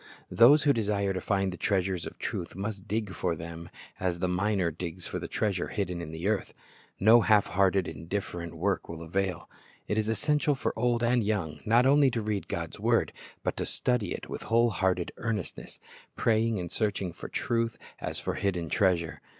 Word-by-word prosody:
Those 140 Hz, +6 st, +7 dB
who 145 Hz, -, +5 dB
desire 100 Hz, -4 st, 0 dB
to 95 Hz, -, -3 dB
find 95 Hz, -2 st, 0 dB
the -, -, -7 dB
treasures 95 Hz, -3 st, 0 dB
of -, -, -10 dB
truth -, -, -4 dB
must 100 Hz, 0 st, -5 dB
dig 105 Hz, -1 st, -2 dB
for 90 Hz, -4 st, -1 dB
them 85 Hz, +1 st, -8 dB, 0.3 s
as 90 Hz, -2 st, 0 dB
the 90 Hz, +1 st, 0 dB
miner 90 Hz, -1 st, +1 dB
digs 85 Hz, +2 st, -6 dB
for -, -, -4 dB
the -, -, -5 dB
treasure 100 Hz, -5 st, -1 dB
hidden 90 Hz, -5 st, -3 dB
in 85 Hz, -, -6 dB
the 80 Hz, +4 st, -4 dB
earth. 105 Hz, -2 st, -1 dB, 0.4 s
No 110 Hz, +4 st, +7 dB
half 105 Hz, -1 st, +4 dB
hearted, 95 Hz, +1 st, +2 dB
indif 95 Hz, +6 st, -3 dB
ferent 85 Hz, -1 st, -6 dB
work -, -, -1 dB
will 85 Hz, 0 st, -6 dB
avail. 90 Hz, 0 st, -2 dB, 0.4 s
It 105 Hz, -, +1 dB
is 110 Hz, 0 st, 0 dB
essential 150 Hz, +5 st, +1 dB
for 135 Hz, -, -2 dB
old 120 Hz, +1 st, +1 dB
and 120 Hz, 0 st, +3 dB
young, 90 Hz, -8 st, -1 dB
not 120 Hz, +3 st, +5 dB
only 140 Hz, 0 st, +6 dB
to 120 Hz, -2 st, -2 dB
read 105 Hz, -2 st, -2 dB
God's 85 Hz, -1 st, -4 dB
word, -, -, +2 dB, 0.3 s
but -, -, -1 dB
to -, -, -1 dB
study 125 Hz, -7 st, 0 dB
it -, -, -5 dB
with -, -, -6 dB
whole 115 Hz, +1 st, +4 dB
hearted 95 Hz, -3 st, 0 dB
earnestness, 110 Hz, -5 st, -4 dB, 0.4 s
praying 115 Hz, 0 st, +2 dB
and 85 Hz, -2 st, -5 dB
searching 100 Hz, -5 st, -1 dB
for -, -, -8 dB
truth 115 Hz, -1 st, -1 dB, 0.2 s
as -, -, -3 dB
for -, -, -2 dB
hidden 90 Hz, -5 st, -1 dB
treasure. 90 Hz, -5 st, +1 dB
100 Hz, 190 wpm, -29 LUFS, 90-110 Hz, 0.4 s, Those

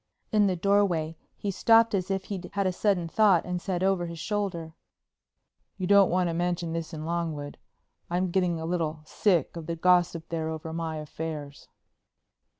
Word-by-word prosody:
In 210 Hz, -2 st, +4 dB
the 185 Hz, -, +1 dB
doorway 175 Hz, -4 st, +1 dB, 0.2 s
he 200 Hz, -, -2 dB
stopped 225 Hz, +3 st, +4 dB
as 190 Hz, -1 st, -1 dB
if 190 Hz, -1 st, -1 dB
he'd 190 Hz, -2 st, -6 dB
had 200 Hz, -1 st, 0 dB
a 185 Hz, -, +2 dB
sudden 180 Hz, -3 st, +1 dB
thought, 190 Hz, -2 st, +4 dB
and 180 Hz, -1 st, -3 dB
said 185 Hz, -1 st, -2 dB
over 190 Hz, -2 st, +1 dB
his 170 Hz, 0 st, -7 dB
shoulder: 175 Hz, -3 st, -3 dB, 1.0 s
"You 185 Hz, -, -2 dB
don't 200 Hz, 0 st, +6 dB
want 180 Hz, 0 st, +2 dB
to 170 Hz, -, -1 dB
mention 175 Hz, -1 st, -1 dB
this 165 Hz, 0 st, -4 dB
in 155 Hz, -2 st, -6 dB
Longwood. 160 Hz, -4 st, -3 dB, 0.5 s
I'm 180 Hz, +1 st, 0 dB
getting 175 Hz, -2 st, +1 dB
a 160 Hz, -, -4 dB
little 160 Hz, -3 st, -2 dB
sick 175 Hz, -3 st, +1 dB
of 165 Hz, -2 st, -7 dB
the 170 Hz, -, -2 dB
gossip 175 Hz, -1 st, +2 dB
there 160 Hz, -1 st, -2 dB
over 160 Hz, 0 st, -5 dB
my 165 Hz, -1 st, -3 dB
affairs." 150 Hz, -1 st, -6 dB
175 Hz, 175 wpm, -27 LUFS, 160-190 Hz, 1.0 s, don't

